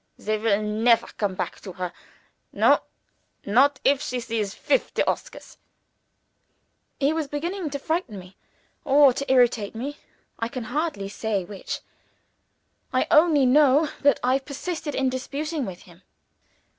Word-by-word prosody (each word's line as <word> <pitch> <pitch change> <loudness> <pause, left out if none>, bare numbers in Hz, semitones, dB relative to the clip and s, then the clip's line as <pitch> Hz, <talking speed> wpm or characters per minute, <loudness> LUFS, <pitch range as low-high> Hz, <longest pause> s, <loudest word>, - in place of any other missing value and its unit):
"They 215 0 -2
will 215 -1 +1
never 225 +2 +3
come 200 -3 -3
back - - -4
to 190 - -8
her 180 -1 -5 0.6
no, - - +4 0.7
not 265 +7 +3
if 275 0 +3
she 255 -4 -3
sees 225 -4 -3
fifty - - 0
Oscars!" - - -4 1.4
He 280 +2 +2
was 320 -2 -2
beginning 335 +4 -3
to 280 - -4
frighten 315 - -3
me, 185 0 -12 0.5
or 280 -2 +6
to 275 +1 -3
irritate 240 -5 +3
me 275 +6 -5 0.4
I 230 - -1
can 250 0 -6
hardly 265 -4 -2
say 200 -2 -2
which. 195 +1 -6 1.1
I - - +2
only 305 -3 +5
know 290 +3 +5
that 285 0 +4
I 255 +2 +3
persisted 295 +2 -5
in 265 -1 +1
disputing 285 +2 -3
with 180 -2 -8
him. 175 0 -18
260 Hz, 140 wpm, -24 LUFS, 215-290 Hz, 1.4 s, or